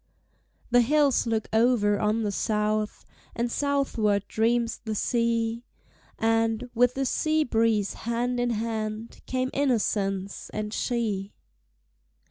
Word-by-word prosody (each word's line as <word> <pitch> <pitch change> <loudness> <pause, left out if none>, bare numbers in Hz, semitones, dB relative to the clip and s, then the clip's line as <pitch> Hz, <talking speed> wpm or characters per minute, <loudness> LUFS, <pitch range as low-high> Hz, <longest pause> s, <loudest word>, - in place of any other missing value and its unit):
The 245 0 +6
hills 280 0 +3
look 220 -1 -1
over 220 -3 +3
on 215 +1 +1
the 205 - -1
South, 215 +1 -1 0.3
And 235 0 -1
southward 230 -9 0
dreams 230 +1 0
the 220 -2 -3
sea; 230 0 0 0.5
And, 225 +2 +1
with 245 +1 +3
the 270 0 0
sea 310 +4 +1
breeze 225 -5 +1
hand 240 +2 -2
in 245 0 +1
hand, 220 0 -3
Came 255 0 -1
innocence 200 -7 -1
and 210 0 -3
she. 215 -6 -2
230 Hz, 115 wpm, -26 LUFS, 215-245 Hz, 0.5 s, The